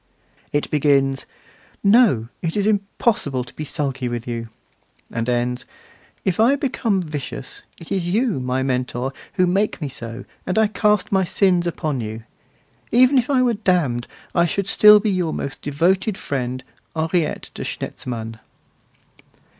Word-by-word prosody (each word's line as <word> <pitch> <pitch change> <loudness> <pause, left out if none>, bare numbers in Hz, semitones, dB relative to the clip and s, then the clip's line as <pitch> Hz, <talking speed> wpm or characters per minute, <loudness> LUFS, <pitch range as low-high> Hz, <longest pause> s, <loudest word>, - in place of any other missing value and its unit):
It 145 - -1
begins: 135 -2 +2 0.6
'No, 200 - +5
it 165 +2 -2
is 200 - +1
impossible 200 - 0
to 125 - -14
be 155 - -6
sulky 135 -5 -1
with 120 0 -4
you!' 115 -1 -4 0.7
and 115 +1 -1
ends: 125 0 0 0.6
'If 190 +1 0
I 240 +5 +5
become 230 -8 0
vicious, 145 -5 -6 0.2
it 165 - -12
is 185 -3 0
you, 215 - +1
my 130 +1 -1
Mentor, 130 0 -1 0.2
who 185 -2 +3
make 195 +4 +1
me 150 -4 -3
so, 115 -2 -7 0.2
and 185 - -2
I 220 - +5
cast 210 -1 +1
my 190 -1 +3
sins 180 -1 +2
upon 155 -6 -2
you. 110 +1 -6 0.7
Even 255 +3 +5
if 245 - -2
I 260 -3 +3
were 245 -2 +3
damned 175 - +1 0.3
I 170 -1 +3
should 195 +4 -1
still 210 +2 +7
be 210 0 0
your 180 -4 -1
most 140 - -5
devoted 185 +8 +1
friend, 130 -2 -3 0.3
Henriette 160 +1 -1
de - - -6
Schnetzmann. 115 -2 -5
165 Hz, 150 wpm, -21 LUFS, 130-200 Hz, 0.7 s, still